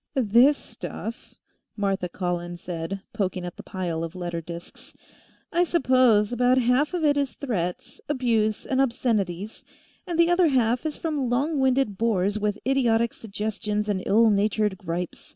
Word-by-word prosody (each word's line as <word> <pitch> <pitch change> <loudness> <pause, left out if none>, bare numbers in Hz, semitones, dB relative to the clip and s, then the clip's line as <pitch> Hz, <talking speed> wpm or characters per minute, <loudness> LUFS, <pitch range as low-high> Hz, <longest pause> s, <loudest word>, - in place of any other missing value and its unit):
"This 255 +4 +5
stuff," 230 +1 -8 0.4
Martha 195 -3 -1
Collins 175 -1 -3
said, 175 +2 -5
poking 190 -4 -2
at 175 - -6
the - - -9
pile 175 -4 -3
of 165 +1 -6
letter 175 -2 -4
disks. 170 +1 -10 0.6
"I 345 +1 +4
suppose 255 -10 +3
about 250 +1 +3
half 260 +7 +2
of 330 -3 0
it 290 -1 +3
is 275 -5 -1
threats, 180 -10 -4
abuse 230 -6 +1
and 265 0 +1
obscenities, 220 -6 -1 0.4
and 345 -2 -2
the 340 +1 +5
other 350 -1 +4
half 250 0 +1
is 300 - -5
from 295 -6 -2
long 280 +5 0
winded 260 -6 +1
bores 210 -2 +1
with 210 0 -1
idiotic 235 -3 +2
suggestions 210 0 -3
and 200 -3 0
ill 220 +2 +5
natured 210 -1 +1
gripes. 175 0 -5
220 Hz, 150 wpm, -25 LUFS, 190-260 Hz, 0.6 s, This